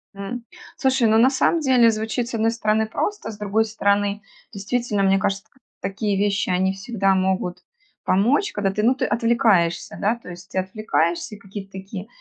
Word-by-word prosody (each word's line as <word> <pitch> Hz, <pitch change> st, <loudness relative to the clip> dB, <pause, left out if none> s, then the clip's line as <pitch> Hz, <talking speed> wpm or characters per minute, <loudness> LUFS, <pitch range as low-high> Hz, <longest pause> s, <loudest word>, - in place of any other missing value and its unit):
М, 200 Hz, +5 st, -6 dB, 0.3 s
слушай, 260 Hz, -3 st, +2 dB
ну 220 Hz, 0 st, +4 dB
на 240 Hz, +4 st, +6 dB
самом 275 Hz, +5 st, +2 dB
деле 250 Hz, -5 st, +5 dB
звучит 220 Hz, +2 st, -2 dB
с -, -, -9 dB
одной 225 Hz, 0 st, +2 dB
стороны 220 Hz, -1 st, +1 dB
просто, 410 Hz, -, -3 dB
с 210 Hz, -, -11 dB
другой 210 Hz, +2 st, +1 dB
стороны 205 Hz, -1 st, 0 dB, 0.3 s
действительно, 205 Hz, +1 st, -1 dB
мне 195 Hz, 0 st, +3 dB
кажется 195 Hz, 0 st, -1 dB, 0.4 s
такие 200 Hz, +1 st, -1 dB
вещи 200 Hz, 0 st, 0 dB
они 185 Hz, +1 st, +1 dB
всегда 195 Hz, -1 st, 0 dB
могут 185 Hz, -1 st, 0 dB, 0.4 s
помочь, 250 Hz, -, +2 dB
когда 200 Hz, -2 st, 0 dB
ты, 210 Hz, -, -2 dB
ну 240 Hz, +4 st, +3 dB
ты -, -, -1 dB
отвлекаешься, 215 Hz, -7 st, +1 dB
да? 210 Hz, +3 st, +2 dB
То 235 Hz, -, -13 dB
есть 180 Hz, +1 st, -11 dB
ты -, -, -6 dB
отвлекаешься, 185 Hz, -1 st, -1 dB
какие-то 195 Hz, 0 st, -9 dB
такие 190 Hz, +1 st, -7 dB
205 Hz, 170 wpm, -22 LUFS, 195-230 Hz, 0.4 s, на